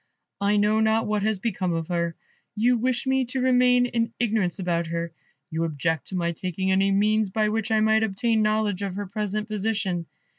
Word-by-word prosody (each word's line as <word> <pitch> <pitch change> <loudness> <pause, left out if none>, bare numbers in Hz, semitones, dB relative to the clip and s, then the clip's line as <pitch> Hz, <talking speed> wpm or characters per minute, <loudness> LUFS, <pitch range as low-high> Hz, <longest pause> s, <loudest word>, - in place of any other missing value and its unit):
I 200 +1 +2
know 210 +1 +3
not 220 +1 +2
what 210 -1 0
has 215 0 0
become 185 -4 -2
of 165 -1 -3
her. 170 -1 -1 0.4
You 240 +4 +3
wish 245 +1 0
me 265 0 +2
to 250 +2 -3
remain 250 -1 +4
in 230 -1 -1
ignorance 215 -7 0
about 170 -3 -1
her; 170 0 -4 0.4
you 160 +1 -1
object 160 0 -2
to 190 - -5
my 170 -1 0
taking 185 +2 -2
any 195 +1 +3
means 210 +1 +2
by 215 +2 +1
which 220 +1 -1
I 220 -1 +2
might 220 0 +3
obtain 220 +1 +1
knowledge 215 -2 +1
of 195 -2 -3
her 205 +1 -3
present 210 +2 -3
position. 200 -5 -2
210 Hz, 195 wpm, -25 LUFS, 185-220 Hz, 0.4 s, remain